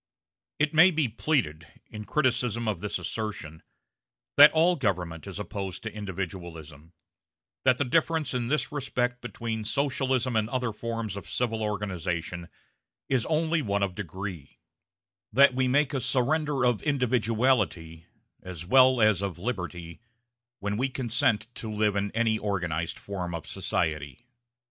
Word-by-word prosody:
It 155 +1 +1
may 160 +4 +8
be 160 -5 +1
pleaded, 110 - -1 0.2
in 105 -1 -7
criticism 125 -5 0
of 105 -5 -1
this 105 - -2
assertion, 100 -8 -5 0.7
that 145 +1 +10
all 170 +3 +4
government 90 - -2
is 95 - -6
opposed 100 -2 -5
to 110 - -5
individualism; 85 -6 -7 0.7
that 130 -1 +5
the 140 - 0
difference 160 +2 +1
in 120 -2 -1
this 150 +4 0
respect 125 -4 -2
between 115 -2 -4
Socialism 130 -1 0
and 110 0 +1
other 125 -3 -1
forms 115 -2 -4
of 100 - -8
civil 115 -3 -1
organization 90 -5 -3 0.6
is 130 -4 +1
only 160 +1 +1
one 100 -5 0
of 95 -2 -1
degree; 95 -5 -7 0.7
that 140 0 +6
we 130 0 +1
make 145 +3 +2
a 135 - -1
surrender 135 +2 +1
of 120 -3 +2
individuality, 115 - 0 0.3
as 85 -3 -7
well 130 +4 +6
as 105 -3 +4
of 100 -4 -3
liberty, 90 -5 -5 0.6
when 105 -1 -3
we 130 +3 0
consent 115 -4 0
to 110 - -6
live 105 -1 +1
in 100 0 0
any 110 -1 +1
organized 85 -6 -2
form 90 -4 -5
of 80 - -6
society. 75 - -2
110 Hz, 140 wpm, -27 LUFS, 95-130 Hz, 0.7 s, that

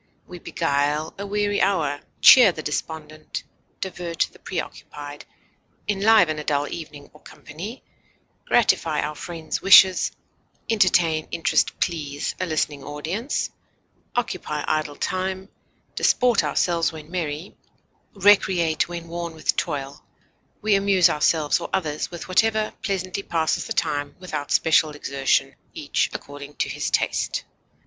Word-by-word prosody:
We 180 - -10
beguile 150 -1 -1
a 200 - -4
weary 205 0 0
hour, 160 -7 +1 0.2
cheer 245 -7 +9
the 155 -2 -8
despondent, 155 0 -5 0.4
divert 175 -3 -2
the - - -19
preoccupied, 145 0 -7 0.6
enliven 200 -6 +4
a - - -5
dull 145 -1 0
evening 150 -3 -9
or 150 - -18
company, 190 - -9 0.6
gratify 165 -9 +2
our 150 - -3
friends' 160 +1 -5
wishes, 190 -1 +7 0.6
entertain, 175 -7 +2
interest, 165 - 0
please 150 -5 -2
a 185 - -1
listening 150 -3 -1
audience, 160 - -3 0.6
occupy 180 -10 -2
idle 155 -2 -1
time, 190 +3 -3 0.4
disport 245 -4 +3
ourselves 170 -2 +1
when 155 0 -11
merry, 165 -1 -4 0.6
recreate 185 -5 +3
when 170 -1 -6
worn 170 -1 -5
with 155 - 0
toil; 140 0 -3 0.6
we 215 -1 +3
amuse 195 -3 +4
ourselves 150 0 +2
or - - -6
others 155 -6 -2
with 170 - -8
whatever 215 +3 +2
pleasantly 190 -1 -2
passes 160 -4 -1
the - - -2
time 145 -2 -1
without 155 -6 -5
special 160 -1 +4
exertion, 135 -2 0 0.2
each - - 0
according 145 0 -9
to - - -1
his - - -3
taste. - - 0
165 Hz, 125 wpm, -23 LUFS, 150-190 Hz, 0.6 s, cheer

